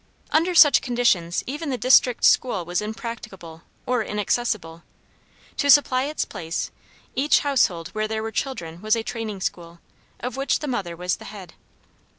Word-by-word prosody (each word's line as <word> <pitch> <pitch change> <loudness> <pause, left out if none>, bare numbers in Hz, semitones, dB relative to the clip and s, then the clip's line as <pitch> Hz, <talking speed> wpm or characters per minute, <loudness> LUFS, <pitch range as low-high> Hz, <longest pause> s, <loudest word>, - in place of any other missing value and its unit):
Under 345 +3 +2
such 295 -3 +7
conditions 225 -9 +1
even 295 +4 -5
the 260 - -1
district 250 -1 +4
school 200 -9 +3
was 175 +3 -1
impracticable 210 -7 -7 0.2
or 250 -2 0
inaccessible. 210 -6 -2 0.8
To 285 - 0
supply 270 -3 +5
its 300 +2 -2
place, 165 0 -5 0.4
each 285 +3 +3
household 190 - +1
where 215 0 -2
there 220 0 -3
were 225 - -4
children 175 -11 -4
was 215 +1 +2
a 225 - -3
training 220 -5 -5
school, 170 -1 -5 0.4
of 250 +2 -5
which 275 +1 +1
the 300 - -6
mother 195 -10 -3
was 180 +1 -2
the - - -13
head. 200 -3 -10
220 Hz, 160 wpm, -23 LUFS, 180-260 Hz, 0.8 s, such